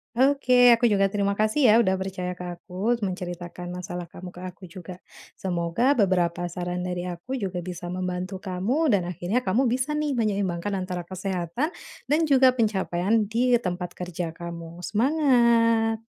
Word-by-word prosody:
Oke, 265 0 +3 0.2
aku 240 - +1
juga 195 -3 +3
terima 200 0 0
kasih, 215 +3 +3
ya, 235 - +6
udah 190 -3 +1
percaya 185 -1 -4
ke 180 - -7
aku, 190 +6 -2
menceritakan 175 -2 -5
masalah 175 0 -5
kamu 180 +2 -10
ke 180 - -12
aku 185 +1 -9
juga, 180 +1 -10 0.3
semoga 185 +9 0
beberapa 175 -4 +1
saran 180 0 -3
dari 180 0 -3
aku 175 +10 -6
juga 195 -8 -3
bisa 175 -1 -6
membantu 185 +1 -3
kamu 210 - 0
dan 180 -3 +1
akhirnya 180 +8 -1
kamu 250 +5 +1
bisa 255 +4 0
nih 300 -2 0
menyeimbangkan 200 -4 -1
antara 185 -1 -3
kesehatan 185 - -3 0.3
dan 300 +2 +2
juga 260 -2 +6
pencapaian 210 -2 +1
di 240 +3 +2
tempat 180 -4 -4
kerja 175 -1 -4
kamu. 170 +1 -8
Semangat. 230 -4 +3
190 Hz, 150 wpm, -25 LUFS, 180-230 Hz, 0.3 s, ya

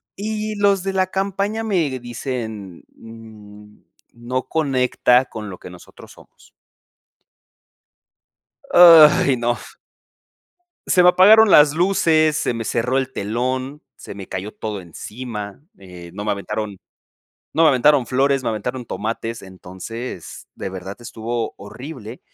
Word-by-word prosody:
y 215 +1 -4
los 200 -2 +2
de 195 0 -3
la 185 -1 +1
campaña 200 +3 -2
me 160 -11 -1
dicen: 115 -6 -6
"N 105 -2 -14 0.3
no 120 +2 -4
conecta 130 -4 +2
con 105 -4 -8
lo 95 - -9
que - - -11
nosotros 90 -1 -15
somos". - - -20 2.3
Ay 155 -5 +8
no. 120 0 -1 1.3
Se 180 - +4
me 180 - +7
apagaron 210 +4 +6
las 145 0 +6
luces, 160 -4 +2
se 120 - -1
me 115 - -4
cerró 125 +4 -1
el 135 -1 -1
telón, 130 +7 -3
se - - -10
me 100 -1 -9
cayó 95 +3 -6
todo 105 -3 -5
encima, 105 - -8 0.2
eh, 90 -3 -12
no 105 +1 -6
me 105 - -1
aventaron 100 0 -5 0.8
no 165 - +3
me 160 - +6
aventaron 135 -1 +3
flores, 135 +1 +1
me 120 - -2
aventaron 125 +4 -4
tomates. 115 +1 -5
Entonces, 95 +3 -9
de 95 - -5
verdad 95 +1 -8
estuvo 115 0 -4
horrible, 120 +2 -10
125 Hz, 130 wpm, -20 LUFS, 105-155 Hz, 2.3 s, Ay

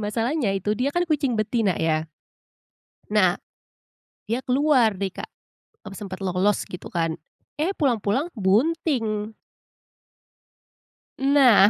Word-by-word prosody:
masalahnya 225 +4 0
itu 205 +2 -1
dia 250 +5 0
kan 350 +5 0
kucing 290 -7 0
betina 215 -3 +1
ya. 160 -1 0 1.0
Nah, 195 -3 +3 0.9
dia 240 +4 -1
keluar 260 -4 +3
deh, 195 0 -2
Kak, - - -8 0.6
m 210 - -9
sempat 195 0 -7
lolos 185 +2 +1
gitu 180 - -9
kan, 165 -2 -2 0.4
eh 365 +6 0
pulang-pulang 265 - 0
bunting. 220 - 0 1.9
Nah. 270 -7 +6
215 Hz, 110 wpm, -24 LUFS, 195-270 Hz, 1.9 s, Nah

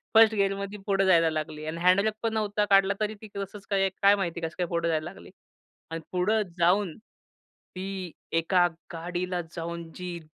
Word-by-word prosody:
First 225 0 +8
गेअरमध्ये 200 0 -1
पुढे 195 -1 +3
जायला 165 -3 +5
लागली. 155 0 -4
आणि 160 +1 -4
हँड 180 +2 +5
ब्रेक 215 +1 0
पण 225 -1 0
नव्हता 210 -1 0
काढला. 195 0 +6
तरी 215 0 0
ती 220 - -9
कसंच 200 0 -6
काय 195 -1 +2
काय 200 +1 +7
माहिती 175 -4 -2
आहे 165 - -2
कसं 160 - -12
काय 180 -1 0
पुढे 170 0 -1
जायला 155 -1 0
लागली. - - -14 0.6
आणि 165 0 -4
पुढं 200 +5 +2 0.2
जाऊन 180 0 +3 0.8
ती 190 -1 -5 0.2
एका 175 +2 +3 0.3
गाडीला 175 +2 -3
जाऊन 170 -1 -5
जी 180 -1 -5
185 Hz, 180 wpm, -27 LUFS, 170-200 Hz, 0.8 s, First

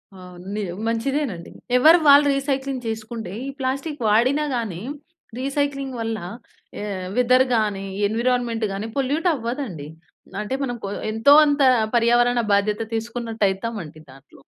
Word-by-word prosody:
అవును. 180 -1 -12
నిజం, 190 -4 -4
మంచిదేనండి. 230 - -2 0.3
ఎవరిది 320 +5 +6
వాళ్ళు 285 +1 +8
రీసైక్లింగ్ 275 -2 -2
చేసుకుంటే 220 -2 -5 0.2
ఈ - - -3
ప్లాస్టిక్ 275 +3 -3
వాడినా 255 +8 +3
గాని 200 -7 -4 0.6
రీసైక్లింగ్ 275 -1 -2
వల్ల 225 -1 -2 0.6
ఆహ్, 195 -3 -4
వెదర్ 255 +1 +5
గాని, 210 -3 0 0.2
ఎన్విరాన్‌మెంట్ 235 0 0
గాని 200 +3 -4
పొల్యూట్ 285 +6 0
అవ్వదండి. 235 - -5 0.5
అంటే, 210 +5 -4
మనం 245 -2 -2
కొ - - -3 0.2
ఎంతో 225 +6 +5
అంత 290 0 +1 0.3
పర్యావరణ 240 +1 +3
బాధ్యత 210 +2 +1
తీసుకున్నట్టయితామండి 220 -6 -3
దాంట్లో. 135 0 -17
235 Hz, 120 wpm, -22 LUFS, 210-270 Hz, 0.6 s, వాళ్ళు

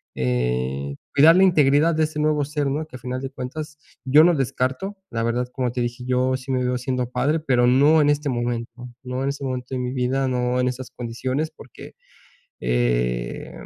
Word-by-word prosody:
eh, 65 +2 -1 0.2
cuidar 155 +4 +7
la 190 - +6
integridad 155 -2 +4
de 160 - +2
ese 155 0 -2
nuevo 150 -1 +2
ser, 150 -1 -2
¿no?, 150 +3 -2
que 140 - -12
al - - -19
final 130 +1 -4
de 135 - -4
cuentas, 150 +4 -6 0.3
yo 145 +4 +6
no 175 -1 +4
descarto, 135 +9 -2
la 115 -1 -2
verdad, 120 +2 0
como 125 -2 -1
te 125 - -3
dije, 120 +1 -3
yo 130 +1 +1
sí 130 +1 -7
me 130 -1 0
veo 125 0 0
siendo 125 -1 -2
padre, 150 +5 +1
pero 125 -5 +2
no 145 +5 +5
en 145 - +3
este 145 0 +1
momento, 120 0 -3
no 125 0 -4
en 140 - 0
este 140 0 -5
momento 125 -1 -4
de - - -2
mi 125 0 -3
vida, 130 +1 0
no 125 0 0
en 125 - +1
esas 130 0 -6
condiciones, 130 +6 -3
porque, 130 -6 -13 0.7
eh, - - -1
130 Hz, 200 wpm, -23 LUFS, 120-145 Hz, 0.7 s, cuidar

